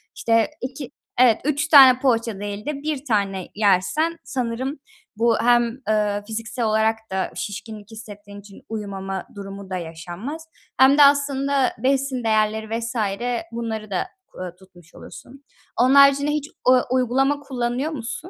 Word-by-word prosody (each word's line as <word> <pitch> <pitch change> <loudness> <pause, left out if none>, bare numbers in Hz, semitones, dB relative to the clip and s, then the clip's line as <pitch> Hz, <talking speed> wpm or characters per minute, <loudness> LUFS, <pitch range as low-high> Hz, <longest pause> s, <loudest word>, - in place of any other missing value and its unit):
işte, 230 +1 +2
2 260 +1 -6 0.3
Evet, 240 -3 +5
3 295 +1 0
tane 265 -4 +8
poğaça 230 -5 0
değil 205 0 -6
de 300 - -2
1 300 -2 -3
tane 195 -5 -1
yersen 220 - +1
sanırım 260 +3 -3 0.4
bu 230 0 +3
hem, 240 +1 +2
eee, 210 -1 0
fiziksel 225 +2 -4
olarak 220 +1 +2
da 190 0 -2
şişkinlik 210 +1 -7
hissettiğin 205 -2 -11
için 200 -1 -15
uyumama 195 -3 -5
durumu 195 -1 -9
da 185 - -3
yaşanmaz 175 - -7 0.3
hem 270 +2 +6
de 295 - +8
aslında 280 -1 +2
besin 265 0 0
değerleri 220 0 0
vs. 230 +1 -5 0.6
bunları 220 -3 -5
da 185 - -1 0.2
ku - - -16
aaa, 180 -1 -6
tutmuş 180 -3 -20
olursun. 275 +3 -13 0.4
Onun 255 +2 +4
haricinde 280 +1 +6
hiç 300 0 -3 0.2
u 255 -1 +6
uygulama 265 +3 +1
kullanıyor 260 +1 -3
musun? 295 +6 -6
230 Hz, 145 wpm, -22 LUFS, 205-270 Hz, 0.6 s, tane